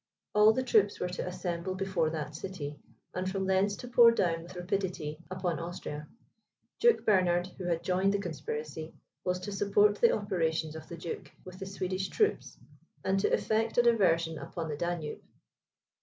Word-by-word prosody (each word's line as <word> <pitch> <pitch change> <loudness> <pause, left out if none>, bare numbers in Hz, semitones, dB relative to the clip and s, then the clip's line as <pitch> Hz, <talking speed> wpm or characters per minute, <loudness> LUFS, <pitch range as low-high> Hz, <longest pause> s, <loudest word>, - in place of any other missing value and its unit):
All 210 +1 +7
the 260 +4 0
troops 215 -5 +3
were 180 - -1
to 180 - -4
assemble 180 0 -3
before 185 -4 0
that 155 -2 -4
city, 150 -4 -6 0.3
and 185 +1 -2
from 190 0 -2
thence 190 +2 +2
to 245 - -8
pour 240 -1 +8
down 175 -7 +1
with 175 +2 -11
rapidity 180 -4 -2
upon 185 -2 -2
Austria. 160 -3 -6 0.7
Duke 475 -1 +4
Bernard, 180 -4 +3
who 185 - -4
had 170 -1 0
joined 185 +2 +2
the 200 - +1
conspiracy, 155 -3 -5 0.3
was 180 0 0
to 205 - -5
support 205 +1 +3
the 235 - +7
operations 160 -6 -1
of 160 0 -9
the 170 - -7
duke, 165 0 -6
with 185 0 -10
the 195 - -5
Swedish 190 0 -2
troops, 425 -1 0 0.5
and 195 +1 +2
to 195 - +1
effect 220 +1 +1
a 240 - +6
diversion 170 -9 +3
upon 165 -2 -5
the 150 - -2
Danube. 170 -1 -3
185 Hz, 170 wpm, -31 LUFS, 165-200 Hz, 0.7 s, pour